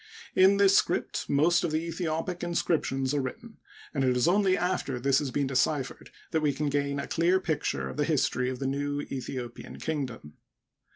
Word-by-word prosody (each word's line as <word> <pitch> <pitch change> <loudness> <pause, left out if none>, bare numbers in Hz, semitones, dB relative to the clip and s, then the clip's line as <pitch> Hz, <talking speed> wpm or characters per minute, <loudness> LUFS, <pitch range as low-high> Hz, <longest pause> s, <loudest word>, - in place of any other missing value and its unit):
In 190 +2 +5
this 195 -1 +5
script - - 0
most 165 +5 +3
of 170 - 0
the 160 +2 -1
Aethiopic 165 +1 -3
inscriptions 150 -6 0
are 145 - +1
written, 220 - -7 0.4
and 140 -3 0
it 125 -1 +2
is 125 - +2
only 190 +1 +3
after 175 -8 -1
this 135 +2 +3
has 145 - -2
been 140 +2 0
deciphered 135 +1 -1 0.2
that 160 - +1
we 150 -2 +2
can 145 +1 -1
give 140 0 0
a 140 - -3
clear 175 +3 +2
picture 150 - -2
of 65 - -7
the - - +2
history 125 +1 +1
of 130 - -4
the 135 - -4
new 145 +1 -1
Aethiopian 125 -2 -6
kingdom. 130 - -4
145 Hz, 185 wpm, -28 LUFS, 130-170 Hz, 0.4 s, In